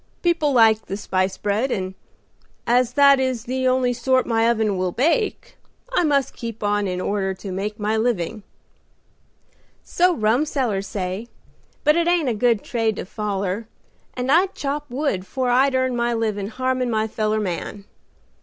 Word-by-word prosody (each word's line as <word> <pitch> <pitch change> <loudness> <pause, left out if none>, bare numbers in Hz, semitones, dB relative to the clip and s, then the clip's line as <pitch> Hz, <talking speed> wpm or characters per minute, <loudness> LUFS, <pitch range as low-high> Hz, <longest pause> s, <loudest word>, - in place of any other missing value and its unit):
People 335 -4 +2
like 225 -3 +4
the 195 - -4
'spice 185 -2 -1
bread,' 210 +6 0
and 185 -5 -2 0.7
as 245 0 +2
that 280 -1 +6
is 260 -4 -1
the 260 +1 -1
only 255 -1 +2
sort 255 +2 +1
my 230 0 +2
oven 220 -3 +1
will 185 -1 -1
bake, 335 - 0 0.4
I 355 - +3
must 285 -4 +1
keep 230 -2 -7
on 205 0 +1
in 180 -1 -3
order 190 0 -1
to 195 +1 -8
make 205 +4 -4
my 210 +1 0
living." 220 -3 -1 1.4
"So 360 0 +2
rumsellers 225 -3 0
say, 190 +3 -4 0.6
but 300 0 +4
it 340 0 +1
ain't 345 -6 +2
a - - +1
good 230 -1 +1
trade 225 -3 -1
to - - -5
foller, 200 +1 -3 0.5
and 250 +1 -1
I'd 365 +5 +3
chop 290 +1 -3
wood 250 -7 -1
'fore 255 -2 -1
I'd 265 +2 +3
earn 260 -1 +1
my 235 0 0
livin' 210 -3 -1
harmin' 255 +2 -1
my 220 -1 0
feller 215 0 -1
man. 200 +1 -4
230 Hz, 165 wpm, -22 LUFS, 205-260 Hz, 1.4 s, that